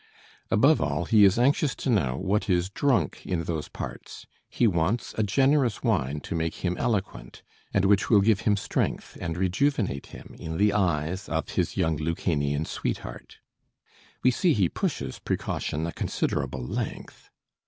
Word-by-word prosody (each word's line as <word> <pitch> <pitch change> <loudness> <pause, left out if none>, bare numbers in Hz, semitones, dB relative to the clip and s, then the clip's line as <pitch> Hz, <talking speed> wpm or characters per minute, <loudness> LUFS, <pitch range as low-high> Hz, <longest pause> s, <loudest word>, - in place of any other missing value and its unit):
Above 150 +3 +4
all, 75 +4 -1
he 105 +3 +5
is 95 0 +5
anxious 140 +3 +2
to - - -5
know 85 - +1
what 100 +3 0
is 90 +1 +1
drunk 115 - +1
in 85 -2 -2
those 80 -2 -3
parts. - - -8 0.2
He 120 - +1
wants 95 +3 0
a - - 0
generous 130 +2 +2
wine 75 - 0
to - - -6
make 80 +2 -2
him 90 0 0
eloquent, 95 - -3 0.3
and 100 -1 +2
"which 100 0 +3
will 105 -4 +6
give 105 -1 +3
him 105 -3 +2
strength, 100 - -2
and 85 -1 -3
rejuvenate 95 - 0
him - - -12
in 80 0 -5
the 105 0 +3
eyes 90 -2 0
of - - -2
his - - -1
young 80 -1 +1
Lucanian 75 -2 -1
sweetheart." - - -5 0.9
We 130 - +5
see 165 +6 +2
he 95 -8 +2
pushes - - -3
precaution 80 +2 -2
a 85 - -3
considerable 65 -1 -2
length. - - -5
95 Hz, 160 wpm, -26 LUFS, 80-110 Hz, 0.9 s, will